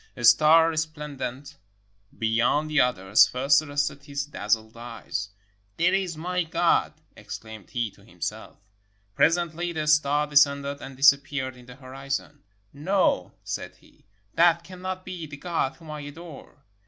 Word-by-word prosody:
A 120 - -7
star 155 +8 +6
resplendent 150 -4 -5 0.6
beyond 120 +7 +1
the 150 - +4
others 100 -5 +4
first 135 +3 +3
arrested 145 -1 -3
his 140 -1 -3
dazzled 110 -5 -2
eyes: 115 -4 -6 0.5
"There 180 +2 +3
is 185 -4 -1
my 180 +3 -1
God," 160 - +1 0.2
exclaimed 110 -3 -10
he 120 -4 -2
to - - -22
himself. - - -7 0.6
Presently 170 - +1
the 155 -1 -2
star 150 -1 +3
descended 140 -1 +2
and 135 -1 -9
disap 140 0 +6
peared 130 -2 -4
in 125 -1 -16
the 125 - -11
horizon. 135 +2 -6 0.3
''No," 150 - +1
said - - -5
he, - - -25 0.3
"that 170 0 +4
cannot 185 +1 -7
be 180 -4 -6
the 145 -1 -9
God 165 -4 -2
whom 160 -2 -12
I 150 - -6
adore." 145 -1 -11
145 Hz, 140 wpm, -25 LUFS, 130-160 Hz, 0.6 s, star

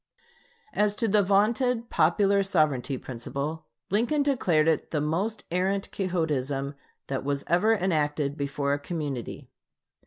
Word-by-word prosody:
As 210 0 +2
to 230 - 0
the 210 0 +4
vaunted 230 +5 +2
popular 200 -1 +3
sovereignty 155 -8 +1
principle, 140 +6 -5 0.2
Lincoln 240 +8 +2
declared 180 - +2
it 160 -2 +1
"the 155 - -1
most 175 +9 -1
arrant 190 +3 0
Quixotism 145 -7 -1 0.3
that 135 -1 -3
was 140 0 -1
ever 210 +7 +3
enacted 150 -6 0
before 140 -1 -1
a 145 - -1
community.... 145 -6 -5
165 Hz, 125 wpm, -27 LUFS, 145-205 Hz, 0.3 s, the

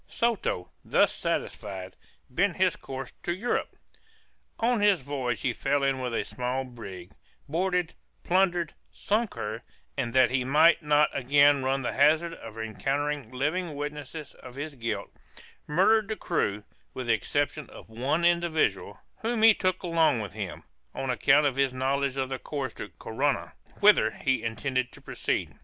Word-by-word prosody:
Soto, 225 - -1
thus - - +3
satisfied, 95 -1 -4 0.3
bent 180 +7 0
his 185 -2 +3
course 130 -1 -7
to - - -2
Europe. 235 +6 -2 0.8
On 235 -1 +2
his 205 -6 +4
voyage 130 -3 -2
he 125 - 0
fell 140 +3 0
in 135 -1 +1
with 125 -1 -3
a - - 0
small 125 +1 -3
brig, 100 -8 -9 0.4
boarded, 180 +2 0 0.3
plundered, 175 -3 +2 0.2
sunk 215 +1 -1
her, 110 +2 -4 0.3
and, 120 - -2
that 130 -2 +5
he 130 -1 +1
might 155 +6 +5
not 150 -1 +3
again 140 +1 +4
run 135 +1 0
the 125 - -2
hazard 155 +4 +3
of 115 -8 -10
encountering 135 +4 -2
living 150 +5 -1
witnesses 150 +1 -6
of 125 -1 -11
his 145 +2 -5
guilt, 115 -6 -4 0.6
murdered 200 +7 +4
the 220 - -2
crew, 105 - -1 0.3
with 130 - -4
the 120 - +3
exception 145 +8 -1
of - - -12
one 135 +9 0
individual, 170 -2 +1 0.2
whom 225 0 -1
he 225 0 +9
took 185 -2 -1
along 165 -7 +3
with 105 -2 -5
him, 105 -4 -6 0.3
on 135 -1 -1
account 140 +4 +4
of 135 -2 +1
his 135 -2 +1
knowledge 135 +1 0
of 130 -1 -1
the 130 -1 -3
course 140 -5 -4
to 105 - -7
Corunna, 135 +5 -1 0.3
whither 205 - +6
he 130 +1 -1
intended 120 +3 -2
to - - -13
proceed. - - -2
140 Hz, 160 wpm, -28 LUFS, 125-170 Hz, 0.8 s, he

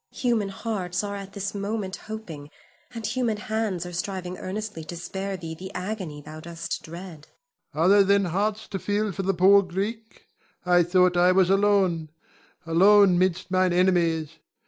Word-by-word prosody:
Human 235 -6 0
hearts 195 -3 -3
are 200 0 -4
at 195 -1 -8
this 200 -1 -4
moment 200 -1 -3
hoping, 175 -10 -8 0.4
and 230 -3 -6
human 235 -2 -1
hands 210 -4 -2
are 175 - -8
striving 180 0 -4
earnestly 205 -3 -5
to 170 +2 -7
spare 190 +2 -4
thee 165 -2 -7
the 185 +4 -8
agony 180 -5 -5
thou 155 +2 -10
dost 170 +1 -5
dread. 170 -2 -10 0.5
Ion. 155 - +1
Are - - +4
there 200 +1 +6
then 200 0 +3
hearts 205 +5 -1
to 195 - -4
feel 205 +3 -1
for 195 - -4
the 195 0 0
poor 195 +3 +6
Greek? 205 +5 -5 0.4
I 180 0 +4
had 175 -1 +3
thought 180 0 +4
I 180 +1 +5
was 185 0 +3
alone, 195 -5 +2 0.6
alone 190 +2 +5
'mid 185 -1 +1
mine 185 -1 +2
enemies. 170 -3 +1
190 Hz, 170 wpm, -25 LUFS, 175-205 Hz, 0.6 s, there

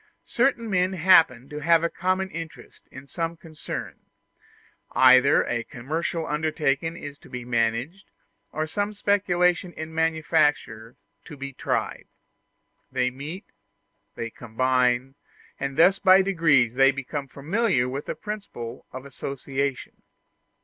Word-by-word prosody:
Certain 240 -2 +1
men 185 -2 +1
happen 160 -8 +4
to 150 +1 -7
have 165 +2 +3
a - - +3
common 185 +2 -1
interest 160 -8 -10
in 130 +1 -11
some 165 +3 -4
concern 160 -2 -7 0.9
either 130 +1 +6
a 115 -1 -2
commercial 160 +7 -4
undertaking 155 +1 -1
is 145 -2 -9
to - - -17
be 125 -2 -7
managed, 120 - -1 0.4
or 155 +1 -2
some 205 +6 -2
speculation 180 -3 +1
in 160 0 -7
manufactures 155 -8 0 0.3
to 150 - -11
be 135 0 -7
tried; - - -3 0.8
they 125 -1 0
meet, 150 +10 -8 0.7
they 115 -1 -5
combine, 125 +2 0 0.5
and 135 0 -4
thus 190 +4 +5
by 190 -1 +6
degrees 160 -11 +3
they 135 +1 +5
become 135 +1 -4
familiar 155 - 0
with 135 +3 -5
the - - -3
principle 200 - -7
of 130 +1 -8
association. 135 0 -4
150 Hz, 125 wpm, -25 LUFS, 130-175 Hz, 0.9 s, either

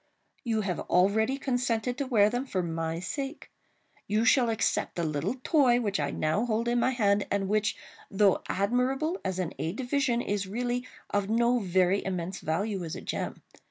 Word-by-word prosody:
—you 225 -4 0
have 185 -5 -2
already 220 +8 +2
consented 245 -3 -1
to 275 +1 -3
wear 215 -5 +5
them, 245 +4 -1
for 190 -9 -2
my 165 0 -2
sake. 275 - -5 0.6
You 215 +2 +1
shall 250 -2 +4
accept 225 - 0
the 170 - -1
little 155 - -1
toy 260 -6 +4
which 205 -6 -1
I 145 -1 0
now 155 +10 0
hold 230 0 0
in 240 0 +2
my 250 - +3
hand, 205 -5 +2
and 200 -1 0
which, 215 +1 +1 0.3
though 195 -1 +3
admirable 255 - 0
as 190 -1 -2
an 180 -3 -2
aid 165 +6 -3
to 265 - -3
vision, 250 -1 +1
is 205 -4 -2
really 245 +4 -2 0.2
of 205 0 0
no 235 +2 +3
very 185 -1 +2
immense 185 -1 -3
value 195 +4 -2
as 160 - -5
a - - -7
gem. - - -4
215 Hz, 185 wpm, -28 LUFS, 190-245 Hz, 0.6 s, wear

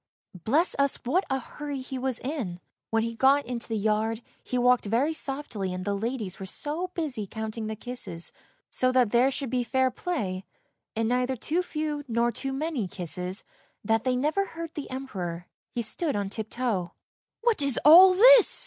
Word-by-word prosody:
Bless 310 +10 +2
us, 280 -1 +3
what 345 +11 +2
a 270 - +1
hurry 285 +2 -6
he 260 0 -5
was 260 -2 -1
in! 250 - -4 0.3
When 225 0 +1
he 230 0 -2
got 270 +4 +4
into 240 -1 -4
the 225 - -2
yard, 220 +2 0 0.2
he 250 - -2
walked 250 -1 +4
very 255 +9 +1
softly 270 -11 -3
and 185 0 -5
the 205 - 0
ladies 220 -1 -3
were 190 - -6
so 310 - -3
busy 270 - -2
counting 220 +1 -5
the 220 - -3
kisses, 220 -7 -4 0.4
so 255 0 +2
that 250 -5 +3
there 245 +2 +4
should 275 -2 -3
be 250 -1 +1
fair 260 +2 +1
play, 215 - -3 0.5
and 225 0 0
neither 250 +2 +1
too 320 +8 -1
few 305 -4 -3
nor 235 0 +1
too 270 +3 -4
many 270 - -2
kisses, 180 +1 -3 0.4
that 225 +1 +2
they 255 0 +1
never 305 +10 +1
heard 330 -3 -7
the 295 - -6
Emperor. 185 -10 -5 0.3
He 240 - 0
stood 290 +7 -1
on 200 -1 -1
tiptoe. 215 -4 -3 0.2
" - - -67
What 460 -8 +3
is 275 -4 +2
all 365 +5 +10
this? - - +7
250 Hz, 185 wpm, -27 LUFS, 220-290 Hz, 0.5 s, all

